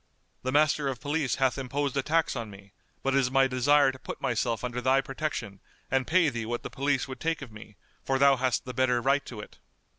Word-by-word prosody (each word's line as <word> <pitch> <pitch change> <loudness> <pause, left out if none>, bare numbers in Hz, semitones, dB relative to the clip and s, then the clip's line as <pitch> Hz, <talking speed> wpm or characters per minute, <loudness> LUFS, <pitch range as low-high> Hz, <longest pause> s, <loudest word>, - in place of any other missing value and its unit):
The 130 - -2
Master 150 0 +3
of 130 -3 -3
Police 145 -3 -1
hath 135 0 +1
imposed 135 +1 -2
a 135 - +2
tax 160 +3 +1
on 115 -3 -4
me, 100 0 -14 0.3
but 135 - +1
it 135 - +4
is 130 -2 +1
my 135 0 +4
desire 135 +2 +3
to 130 - -13
put - - -7
myself 115 -2 -1
under 125 0 -3
thy 130 +2 +3
protection 135 -8 -4 0.3
and 135 -1 +1
pay 175 0 +4
thee 120 -4 -4
what 120 +1 -3
the - - -6
police 140 -1 0
would 130 - -8
take 165 -2 -2
of 125 - -10
me, 105 -1 -12 0.3
for 135 - 0
thou 140 0 +5
hast 130 -1 0
the 125 - -6
better 125 -1 +2
right 135 +3 +2
to 110 -4 -7
it." - - -13
130 Hz, 235 wpm, -28 LUFS, 125-140 Hz, 0.3 s, thou